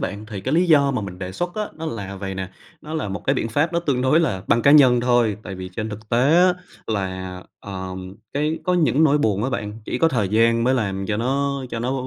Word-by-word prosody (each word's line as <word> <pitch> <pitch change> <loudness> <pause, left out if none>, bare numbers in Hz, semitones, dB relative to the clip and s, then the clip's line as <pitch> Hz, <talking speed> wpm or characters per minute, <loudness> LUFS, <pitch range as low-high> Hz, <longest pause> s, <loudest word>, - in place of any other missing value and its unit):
bạn 105 +2 -4
thì 105 -3 -6
cái 130 +9 -1
lý 175 +2 +3
do 145 -4 +5
mà 130 - -1
mình 90 -2 -7
đề 90 0 -5
xuất 175 - -3
á 210 -1 -3
nó 160 +1 -5
là 100 -7 -5
vầy 95 0 -5
nè, 95 0 -5 0.3
nó 155 +1 -7
là 155 -9 -2
một 100 +1 -6
cái 135 - +2
biện 120 - -1
pháp 145 +9 0
nó 170 - +1
tương 140 -6 0
đối 130 +5 +4
là 100 - -1
băng 120 - +3
cá 140 - +5
nhân 130 -5 +7
thôi. 120 -4 +2
Tại 95 - -7
vì 95 0 -7
trên 110 -1 -2
thực 110 +1 -9
tế 125 +7 +3
á 180 0 +5 0.3
là, 95 -3 -4 0.2
ờ, 95 -2 -6 0.4
cái 150 +3 -1
có 180 -1 +2
những 160 -3 +3
nỗi 150 -1 +4
buồn 105 -5 +1
á 130 - -1
bạn, 105 -3 -4
chỉ - - -3
có 165 - +4
thời 110 -10 0
gian 115 +3 +3
mới 130 +2 +3
làm 95 -5 -2
cho 105 - -1
nó 140 +3 -1
cho 115 - -3
nó 125 +3 -1
120 Hz, 265 wpm, -22 LUFS, 100-145 Hz, 0.4 s, nhân